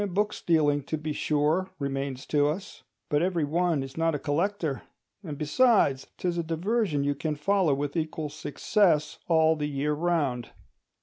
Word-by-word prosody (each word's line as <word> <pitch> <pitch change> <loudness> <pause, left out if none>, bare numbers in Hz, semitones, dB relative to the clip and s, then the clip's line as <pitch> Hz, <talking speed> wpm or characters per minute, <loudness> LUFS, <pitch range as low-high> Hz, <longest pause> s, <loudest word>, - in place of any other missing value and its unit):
Book 210 +1 +1
stealing, 150 -4 +2
to 155 - -2
be 155 0 -4
sure, 155 +6 +1
remains 135 -1 -3
to 145 -1 +2
us; 185 +7 -4 0.3
but 145 0 +1
every 175 -2 +1
one 165 -1 +1
is 135 +2 -10
not 165 -1 +1
a - - 0
collector; 160 0 -1 0.4
and, 150 -5 -6
besides, 150 - +3
'tis 175 -1 -1
a - - 0
diversion 165 -1 0
you 145 0 +1
can 150 +2 -3
follow 175 -1 +2
with 145 0 -3
equal 155 -2 -2
success 155 +1 +1
all 160 -1 +4
the 150 -1 -2
year 145 +1 -1
round. 150 -7 0
155 Hz, 165 wpm, -27 LUFS, 145-175 Hz, 0.4 s, all